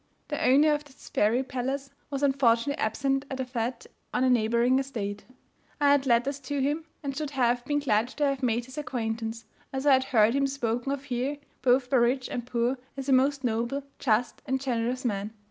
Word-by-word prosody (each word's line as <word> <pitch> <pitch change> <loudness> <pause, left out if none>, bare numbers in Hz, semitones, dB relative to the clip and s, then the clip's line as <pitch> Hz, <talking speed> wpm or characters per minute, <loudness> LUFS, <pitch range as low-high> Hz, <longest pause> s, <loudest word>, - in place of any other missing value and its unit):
The 295 - -2
owner 290 +4 +5
of 295 0 -2
this 285 -2 -15
fairy 230 +5 +2
palace 270 +1 -3 0.2
was 280 0 -3
unfortunately 270 -1 +2
absent 270 +5 0
at 265 - -5
a 260 - -1
fete 245 -1 -3 0.3
on - - +1
a 260 - +4
neighbouring 235 +2 +3
estate. 210 -7 -4 0.5
I 285 -1 +5
had 280 -1 +3
letters 260 +4 +2
to 280 +1 -3
him, 295 +4 0 0.2
and 275 -1 -3
should 300 0 -3
have 245 -3 +1
been 290 +2 0
glad 235 -6 +2
to 290 +3 -1
have 275 -1 0
made 240 -1 0
his 260 +3 -7
acquaintance, 225 -4 -3 0.3
as 265 +1 -3
I 285 - +7
had 260 0 +3
heard 225 -3 +4
him 275 0 +2
spoken 245 -1 -2
of 280 -1 -3
here, 260 +2 -2 0.2
both 250 0 +3
by 265 - +5
rich 250 +2 +2
and 245 -1 -4
poor, 245 +1 0 0.2
as 270 0 -4
a - - +5
most 275 +2 +3
noble, 235 +4 -1 0.2
just 235 -1 +1
and 265 0 0
generous 250 0 -1
man. 205 -1 -2
260 Hz, 200 wpm, -27 LUFS, 235-275 Hz, 0.5 s, I